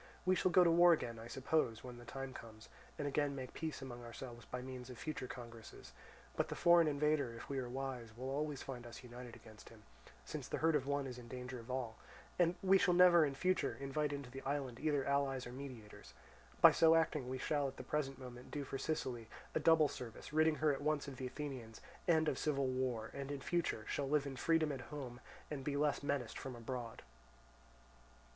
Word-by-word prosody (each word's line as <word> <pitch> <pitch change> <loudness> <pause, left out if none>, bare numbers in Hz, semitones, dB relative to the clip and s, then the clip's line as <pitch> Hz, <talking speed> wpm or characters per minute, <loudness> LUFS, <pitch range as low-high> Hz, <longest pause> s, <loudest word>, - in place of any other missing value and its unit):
We 185 - +5
shall 185 - +2
go 180 +1 +7
to 170 - +5
war 175 +1 +8
again, 115 -7 -2
I 115 - -8
suppose, 125 -2 0
when 125 -1 -8
the 120 - -11
time 135 +1 -5
comes, 110 -2 -11 0.3
and 145 - -2
again 145 0 +1
make 130 -2 -6
peace 155 -4 -4
among 120 -2 -7
ourselves 120 0 -8
by 125 - -4
means 130 -1 -7
of 125 - -8
future 155 -5 -4
congresses; 115 -3 -10 0.4
but - - +1
the - - -4
foreign 170 -1 +6
invader, 145 -4 +1
if 115 - -9
we 135 -1 -1
are 125 -2 -4
wise, 130 -2 -4
will 130 +2 -4
always 145 0 -2
find 120 -3 -6
us 120 - -10
united 120 0 -9
against 110 -1 -14
him, 110 -2 -16 0.4
since - - -5
the - - -2
hurt 165 0 +3
of 135 -2 +1
one 140 -1 0
is 125 -2 -6
the - - -8
danger 125 +1 -6
of 115 +2 -12
all; 125 -4 -3 0.4
and 175 0 +4
we 190 0 +6
shall 180 -3 +4
never, 175 -2 +8
in 140 - -4
future, 185 +7 +1
invite 140 +2 -1
into 140 -3 -5
the 135 +1 -7
island 135 -3 -2
either 145 -3 +1
allies 140 -2 +1
or 120 - -7
mediators. 120 - -9 0.5
By - - +11
so 165 0 +6
acting 150 -5 +1
we 130 - -2
shall 145 +1 0
at 135 - -7
the - - -6
present 140 -3 -1
moment 125 -1 -9
do 145 - -3
for 135 0 -5
Sicily 130 -6 -2 0.3
a - - +2
double 160 0 +6
service, 125 +2 -8
ridding 155 0 +4
her 150 -1 +3
at 135 - -4
once 150 0 0
of 135 -2 -7
the 130 - -3
Athenians, 130 -5 -6 0.3
and 160 -2 +4
of - - 0
civil 140 -3 +1
war, 130 -4 -1
and 140 0 -5
in 145 -1 -3
future 150 -7 -1
shall 140 -1 -1
live 145 -1 +3
in 140 -1 -4
freedom 160 +3 +2
at 135 -3 -4
home, 130 -5 -6 0.3
and 140 -3 -3
be 140 +1 -1
less 145 0 +2
menaced 140 -5 -2
from 130 -2 -6
abroad." 120 -1 -5
135 Hz, 220 wpm, -37 LUFS, 125-150 Hz, 0.5 s, By